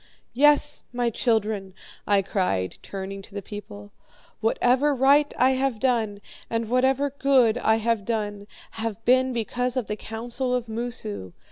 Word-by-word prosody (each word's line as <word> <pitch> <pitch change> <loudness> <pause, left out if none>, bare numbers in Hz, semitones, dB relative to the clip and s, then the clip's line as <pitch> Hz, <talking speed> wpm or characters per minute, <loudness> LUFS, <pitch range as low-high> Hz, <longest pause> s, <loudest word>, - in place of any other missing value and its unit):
"'Yes, 295 +2 +4
my 240 -1 0
children,' 210 -5 0 0.3
I 200 -1 +3
cried, 140 - -1
turning 195 0 -6
to 195 - -14
the 200 - -3
people, 205 0 -9 0.5
'whatever 250 +6 +2
right 280 +3 +4
I 255 +1 +4
have 260 -3 0
done, 220 -5 0 0.3
and 230 -1 -1
whatever 265 +3 +2
good 260 -4 +3
I 220 -2 +3
have 225 -1 0
done, 205 -2 -3 0.3
have 225 0 -4
been 255 +1 +4
because 245 +2 -2
of 250 - 0
the 210 - -3
counsel 240 +4 -3
of 245 -1 -2
Moosu. 165 - -5
230 Hz, 145 wpm, -25 LUFS, 205-255 Hz, 0.5 s, Yes